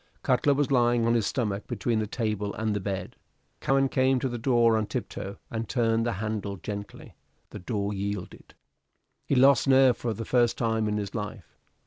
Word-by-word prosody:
Cutler 135 Hz, +3 st, +3 dB
was 145 Hz, 0 st, 0 dB
lying 120 Hz, -2 st, +3 dB
on 115 Hz, -, +3 dB
his 115 Hz, -4 st, +1 dB
stomach 105 Hz, -5 st, -2 dB
between 115 Hz, 0 st, -1 dB
the 110 Hz, -, -2 dB
table 105 Hz, -2 st, -2 dB
and 110 Hz, -1 st, -1 dB
the -, -, 0 dB
bed. 95 Hz, -2 st, -4 dB, 0.4 s
Cowen 135 Hz, 0 st, +2 dB
came 130 Hz, 0 st, +2 dB
to 130 Hz, -, -1 dB
the 120 Hz, -2 st, -4 dB
door 120 Hz, -2 st, +3 dB
on 110 Hz, -1 st, 0 dB
tiptoe 100 Hz, +1 st, -5 dB
and 115 Hz, 0 st, -4 dB
turned 115 Hz, -2 st, +1 dB
the 120 Hz, -, 0 dB
handle 100 Hz, -1 st, -3 dB
gently; 100 Hz, +3 st, -7 dB, 0.4 s
the -, -, -7 dB
door 100 Hz, +2 st, -2 dB
yielded. 100 Hz, -1 st, -5 dB, 0.7 s
He -, -, +1 dB
lost 135 Hz, +1 st, +5 dB
nerve 130 Hz, -2 st, +6 dB
for 115 Hz, -2 st, -3 dB
the 115 Hz, -, -5 dB
first 120 Hz, -1 st, +2 dB
time 110 Hz, -2 st, 0 dB
in 105 Hz, 0 st, -1 dB
his 100 Hz, -2 st, -4 dB
life. 105 Hz, -3 st, -6 dB
115 Hz, 185 wpm, -27 LUFS, 105-120 Hz, 0.7 s, nerve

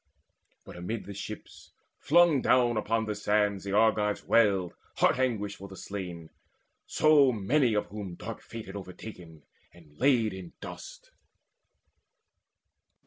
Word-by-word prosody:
But -, -, -11 dB
amidst 105 Hz, +6 st, -4 dB
the 100 Hz, -, -7 dB
ships 100 Hz, -, -9 dB, 0.3 s
Flung 165 Hz, -3 st, +4 dB
down 120 Hz, -2 st, +3 dB
upon 110 Hz, +1 st, 0 dB
the 105 Hz, -, -2 dB
sands 105 Hz, -1 st, 0 dB
the 100 Hz, 0 st, -4 dB
Argives 105 Hz, -1 st, +2 dB
wailed 100 Hz, -6 st, +3 dB, 0.2 s
Heart -, -, +3 dB
anguished 110 Hz, -6 st, -1 dB
for 100 Hz, -, -9 dB
the 95 Hz, -, -11 dB
slain, 90 Hz, -5 st, -7 dB, 0.6 s
so 150 Hz, -4 st, +5 dB
many 120 Hz, +3 st, +1 dB
of 105 Hz, -, +1 dB
whom 100 Hz, -3 st, -7 dB
Dark -, -, -7 dB
fate 115 Hz, -1 st, -9 dB
had 95 Hz, -, -9 dB
overtaken 90 Hz, -4 st, -10 dB, 0.3 s
and 80 Hz, -4 st, -19 dB
laid 120 Hz, -6 st, +3 dB
in 95 Hz, -3 st, -9 dB
dust. -, -, -10 dB
105 Hz, 135 wpm, -29 LUFS, 95-115 Hz, 0.6 s, so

